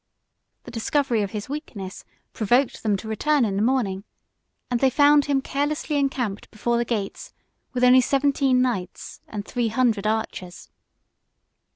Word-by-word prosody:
The - - -10
discovery 240 0 0
of 200 - -2
his 210 -1 -5
weakness, 235 -10 -7 0.3
provoked 240 +5 +1
them 210 -3 +1
to 220 - -9
return 275 +5 +2
in 200 -3 -2
the 200 - 0
morning; 220 -6 0 0.7
and 245 - +1
they 265 - +4
found 290 +2 +5
him 275 -2 0
carelessly 295 +2 -2
encamped 260 -7 -1
before 235 +2 -1
the 240 - 0
gates 210 -4 -4 0.4
with 250 0 -1
only 250 +1 +7
seventeen 270 -1 +2
knights 210 -8 -4
and 205 -1 -6
three 240 -1 -1
hundred 225 -3 +1
archers. 215 -5 -4
240 Hz, 150 wpm, -24 LUFS, 210-275 Hz, 0.7 s, only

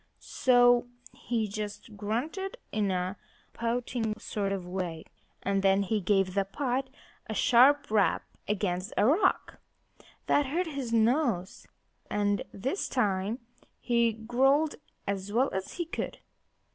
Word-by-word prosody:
So 245 -1 +4 0.3
he 230 -3 -2
just 210 +2 -6
grunted 290 - -3
in 210 -2 0
a 185 +1 -1 0.4
pouting 230 -1 -2
sort 200 -2 -3
of 190 -2 -3
way; 180 -3 -4 0.4
and 195 0 +1
then 195 0 +4
he 210 +2 0
gave 195 0 +2
the 200 0 +2
pot 260 +5 -2 0.4
a 220 - -4
sharp 280 +2 +5
rap 210 -3 +3 0.2
against 195 -1 -1
a - - +4
rock. 355 - +2 0.7
That 290 -1 +3
hurt 340 +7 0
his 275 -7 -4
nose. 230 - +1 0.4
And 205 -1 +1
this 265 - -2
time 210 -1 0 0.4
he 235 -1 +2
growled 265 +7 +2 0.3
as 200 0 -3
well 250 +5 +2
as 190 0 -4
he 345 - -3
could. 330 - -4
220 Hz, 130 wpm, -29 LUFS, 195-260 Hz, 0.7 s, sharp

